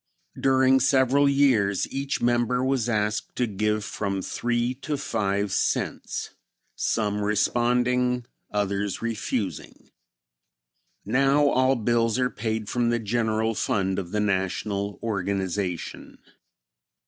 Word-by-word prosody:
During 130 0 +4
several 135 +1 +3
years 125 -9 +3
each 135 -2 -2
member 120 +1 +2
was 130 -3 0
asked 105 -1 -1
to 125 - +1
give 105 0 -1
from 100 -3 -3
three 120 +1 -1
to 150 0 -2
five 100 -5 -1
cents; - - -1 0.4
some 105 -2 0
responding, 125 +3 +1 0.2
others 100 0 -2
refusing. 105 - -4 1.1
Now 135 +6 +3
all 130 0 +3
bills 115 0 +1
are 125 -1 +1
paid 110 0 -3
from 120 +1 0
the 120 - +2
general 110 0 0
fund 95 -2 0
of 90 -3 -6
the 105 - -1
National 100 0 -1
organization. 95 -4 -3
110 Hz, 110 wpm, -25 LUFS, 100-125 Hz, 1.1 s, During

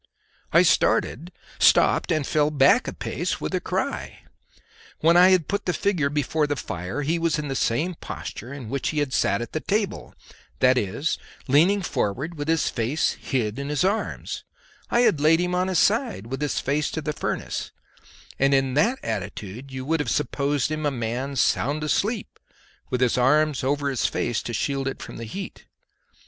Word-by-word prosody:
I - - +6
started, 170 +8 +2 0.3
stopped, - - +4
and 155 -3 +1
fell 150 +1 +2
back 140 -3 +4
a - - -3
pace - - -3
with - - -4
a - - 0
cry. - - -3 0.8
When 165 +2 +5
I 180 +1 +8
had 185 -5 +3
put 200 0 -2
the 180 - +1
figure 175 -8 +1
before 150 +1 0
the 145 - -1
fire 95 - -4
he 165 +4 0
was 165 -1 +1
in 150 -1 -4
the 135 - -2
same 155 +10 0
posture 125 -6 -7
in 140 -5 -7
which 140 - -1
he 155 - -4
had 145 -3 0
sat 100 +4 +1
at - - -9
the 155 - -1
table, 205 +3 -2 0.4
that 130 0 +4
is, 120 - -1 0.3
leaning 175 +9 +4
forward 140 - -2
with 145 -1 -5
his 165 -1 +2
face 125 +6 0
hid 120 -2 -2
in 140 +1 -4
his 150 +3 0
arms; 205 +3 -2 0.5
I 240 - +3
had 160 -11 +3
laid 160 +2 +5
him 180 0 0
on 180 +1 +1
his 185 -2 0
side, 225 - +1
with 135 +4 -5
his 145 -2 0
face 145 +3 0
to 160 - -2
the 150 - -2
furnace, - - -3 0.7
and 135 +1 +4
in 135 -1 +1
that 220 - +2
attitude 110 +4 -5
you 130 0 -5
would 165 +3 +1
have 145 - -1
supposed 145 0 0
him 155 0 -2
a - - +3
man 125 +2 -3
sound 145 +3 +1
asleep 200 - -1 0.5
with 125 -1 -1
his 125 0 +2
arms 150 +2 +3
over 140 +2 0
his 135 -3 +1
face 120 - -1
to 120 - -6
shield 135 +2 -1
it 135 - -4
from - - -8
the 115 - -6
heat. 190 - -8
145 Hz, 190 wpm, -24 LUFS, 130-165 Hz, 0.8 s, I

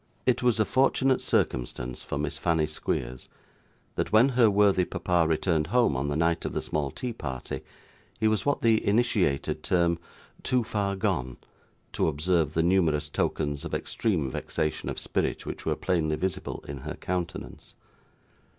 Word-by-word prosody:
It 125 -2 +2
was 120 -3 +2
a 110 - +4
fortunate 130 +1 +2
circumstance - - -1
for - - -4
Miss 75 +1 -2
Fanny 80 -2 +2
Squeers, 65 -5 -4 0.6
that - - -2
when 110 +5 +6
her 120 -4 +5
worthy 100 -2 +4
papa 90 -2 +1
returned 80 0 +1
home 120 - +3
on 65 +2 -1
the 70 - -1
night 85 +1 +1
of - - -3
the - - -1
small 75 -2 -1
tea 120 - -4
party, 65 - -5 0.6
he 110 - +3
was 110 -2 +1
what 145 0 0
the 115 -1 +3
initiated 100 - +1
term 85 -1 +2 0.4
'too 125 -2 +1
far 100 -3 -1
gone' 65 -9 -1 0.6
to - - +1
observe 80 0 +1
the 80 - +3
numerous 85 -5 +2
tokens 75 -2 -1
of - - -3
extreme 80 - -1
vexation 75 +4 -2
of - - -4
spirit - - -1
which - - -6
were - - +2
plainly 80 -4 0
visible 95 +2 -3
in 70 -1 -6
her - - -6
countenance. 90 -1 -5
85 Hz, 160 wpm, -27 LUFS, 75-110 Hz, 0.6 s, when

